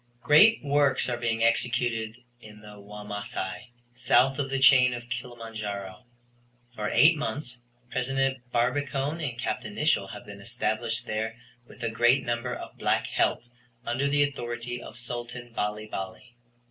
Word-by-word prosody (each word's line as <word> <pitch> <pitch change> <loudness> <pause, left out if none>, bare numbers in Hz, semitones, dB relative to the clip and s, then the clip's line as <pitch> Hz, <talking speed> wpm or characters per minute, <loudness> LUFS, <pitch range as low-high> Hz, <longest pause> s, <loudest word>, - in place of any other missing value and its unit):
Great 210 +10 +6
works 140 -2 +2
are 120 - -1
being 115 -1 0
executed 115 -1 +1 0.2
in 105 -1 -13
the 105 -1 -12
Wamasai, 105 -1 -6 0.2
south 125 +2 +3
of 135 -1 -1
the 135 - 0
chain 130 -2 +6
of 120 0 -8
Kilimanjaro. 115 -4 -6 0.7
For 105 -3 -3
eight 160 +2 +6
months 140 -4 -4 0.3
President 135 +1 0
Barbicane 140 +5 0
and 125 -6 -3
Capt. - - -2
Nicholl - - +1
have - - -9
been - - -10
established 115 +2 -2
there 110 0 -2 0.3
with - - -12
a 115 - +1
great 120 +3 +3
number 120 +1 -1
of - - -9
black - - +1
help - - +1 0.4
under 130 +4 0
the 145 +1 +3
authority 120 -3 -4
of - - -10
Sultan 120 0 -6
Bali 105 0 -2
Bali. 95 +3 -7
120 Hz, 145 wpm, -27 LUFS, 110-135 Hz, 0.7 s, Great